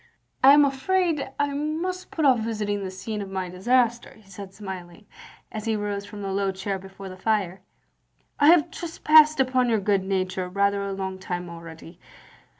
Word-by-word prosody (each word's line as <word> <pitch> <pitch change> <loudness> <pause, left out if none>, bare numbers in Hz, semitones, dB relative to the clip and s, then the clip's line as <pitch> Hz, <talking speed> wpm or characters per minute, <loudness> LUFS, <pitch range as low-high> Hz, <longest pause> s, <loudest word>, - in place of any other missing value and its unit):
" - - -43
I 270 +1 +9
am 290 0 +7
afraid 310 +2 0
I 285 0 0
must 325 +6 -3
put 315 - -1
off 260 -4 +5
visiting 210 -2 -2
the 190 - -4
scene 195 +3 -5
of 195 - -6
my 190 -1 -4
disaster, 235 +6 +1
" - - -21
he 210 - -22
said, 195 0 -10
smiling, 190 -1 -9 0.5
as 215 0 -6
he 225 -1 0
rose 205 -1 -3
from 205 0 -9
the 195 - -3
low 195 0 0
chair 190 +1 -4
before 195 +1 -11
the 185 - -8
fire. 190 -2 -1 0.4
" - - -47 0.3
I 290 - +5
have 335 -2 +5
trespassed 310 -3 +4
upon 255 -1 +2
your 225 -2 +2
good 200 -1 +1
nature 185 -1 -2
rather 200 +1 +1
a 200 0 -3
long 190 -1 -4
time 180 -2 -5
already. 165 0 -11
205 Hz, 195 wpm, -25 LUFS, 190-260 Hz, 0.5 s, I